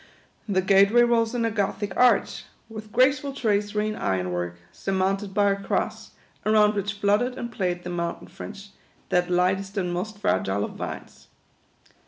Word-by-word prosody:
The 190 -2 +2
gate 195 +1 +5
way 240 +1 +6
rose 235 0 +2
in 235 -1 +1
a 225 - 0
Gothic 205 -1 -2
arch, 250 0 +3 0.2
with 215 -1 -9
graceful 270 +3 +2
tracery 210 -4 0
in 215 - -3
iron 90 - -1
work, 90 0 -3 0.2
surmounted 195 +1 -1
by 200 0 +3
a - - +1
Cross, - - -2 0.3
around 215 -1 +4
which 200 -1 -2
flut 205 +2 +2
tered 250 +1 -2
and 235 -1 -5
played 180 -5 -2
the 180 - -5
Mountain 170 -1 -4
Fringe, 200 -1 -10 0.4
that 180 0 +1
lightest 190 +3 0
and 180 -2 -1
most 205 +4 -4
fragile 100 - 0
of - - -8
vines. - - -8
200 Hz, 170 wpm, -25 LUFS, 185-220 Hz, 0.4 s, way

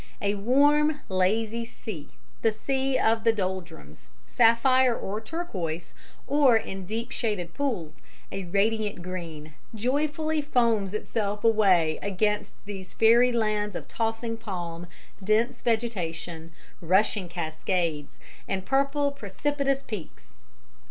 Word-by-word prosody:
A 200 0 +1
warm, 290 +8 +3
lazy 215 +5 +1
sea, 210 -8 -8 0.3
the 225 - +3
sea 265 +4 0
of 225 0 +2
the 230 - +5
doldrums, 180 - -5 0.2
sapphire 245 +2 +4
or 210 +3 -4
turquoise, 185 - -4 0.3
or, 275 -4 +5
in 190 -3 -5
deep 230 +4 -3
shaded 195 -7 -2
pools, 185 - -2 0.3
a 195 -1 -4
radiant 205 +1 0
green, 165 -4 -6 0.2
joyfully 300 +6 0
foams 230 -8 +1
itself 210 -1 -2
away 190 -8 +4
against 205 +1 -1
these 195 -2 -8
fairy 235 +3 +6
lands 215 -3 0
of - - -6
tossing 225 0 -2
palm, 175 -5 -5 0.4
dense 225 +5 +1
vegetation, 175 -8 -2 0.3
rushing 185 +2 +2
cascades, 165 -2 -2 0.3
and 190 -1 -2
purple, 280 +1 +2
precipitous 275 +4 -1
peaks. 205 -9 -8
215 Hz, 110 wpm, -27 LUFS, 185-240 Hz, 0.4 s, fairy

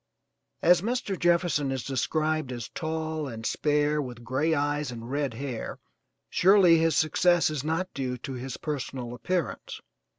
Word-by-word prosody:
As 175 0 +6
Mr. 230 -1 -1
Jefferson 170 -5 +2
is 130 -3 -2
described 155 +2 -1
as 120 -3 -5
tall 160 -1 -3
and 115 -3 -7
spare 150 +2 +1
with 120 -3 -7
gray 140 +7 +1
eyes 145 -1 0
and 120 0 -7
red 140 -4 -1
hair, 130 -2 -5 0.5
surely 185 -3 +5
his 165 -2 +2
success 165 +2 +3
is 145 -3 -3
not 165 +4 -2
due 130 -2 -3
to 135 +2 -6
his 130 0 -5
personal 130 -5 -4
appearance. 150 +4 -3
150 Hz, 145 wpm, -27 LUFS, 130-165 Hz, 0.5 s, As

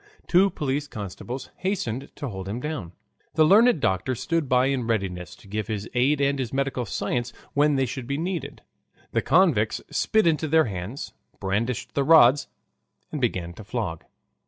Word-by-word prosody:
Two 190 +3 +4
police 145 -3 -2
constables 110 +4 -7
hastened 140 - -2
to 145 - -5
hold 95 -2 -6
him 110 +4 -3
down. 125 - -5 0.4
The 155 - +5
learned 215 +3 +6
doctor 95 +1 0
stood 165 +3 -1
by, 125 0 +4
in 135 -4 0
readiness 90 -5 -2
to 100 - -18
give 105 +2 -3
his 105 -1 -3
aid 135 +4 +2
and 140 0 +1
his 125 -4 -2
medical 135 -3 -1
science 120 +5 -2 0.2
when 145 0 +3
they 135 -1 +2
should 125 0 -6
be 140 +1 -1
needed. 165 -4 -4 0.5
The - - +1
convicts 140 - +3
spit 220 -2 +2
into 160 -1 +2
their 160 +1 +4
hands, 100 +5 -5 0.3
brandished 110 +5 -2
the 140 - +1
rods, 145 -3 +6 0.6
and 150 - -4
began 90 -8 -1
to 110 - -11
flog. 100 -7 -4
130 Hz, 170 wpm, -25 LUFS, 110-150 Hz, 0.6 s, learned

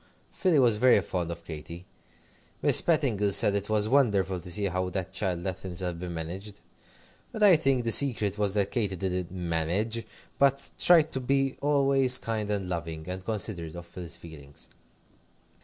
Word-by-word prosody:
Philly 180 -5 +1
was 120 -5 +3
very 125 -1 +5
fond 90 -3 -4
of 85 0 -7
Katy. 85 +3 -9 0.8
Miss - - +6
Petingill 125 - +1
said 100 - +5
it 100 0 -3
was 105 -1 +2
wonderful 105 -8 +1
to 85 - -8
see 100 +4 +1
how 95 -1 -2
that 95 0 -5
child 90 -3 -2
let 95 -1 -4
himself 90 -2 -4
be 90 - -6
managed. 90 +5 -7 0.7
But 215 - -3
I 195 -4 +7
think 135 -5 +1
the 115 - 0
secret 110 -7 +3
was 105 -1 0
that 100 -2 0
Katy 105 -6 -2
didn't 90 -1 -3
"manage," 90 +6 -2 0.4
but 140 0 +2
tried 160 -3 +4
to 130 - -3
be 135 +1 0
always 140 -3 +3
kind 110 -2 -4
and 100 -3 -2
loving, 80 -2 -5
and 90 +1 -6
considerate 95 -6 -3
of 85 0 -9
Phil's 85 -1 -9
feelings. 75 -4 -12
100 Hz, 170 wpm, -27 LUFS, 90-125 Hz, 0.8 s, I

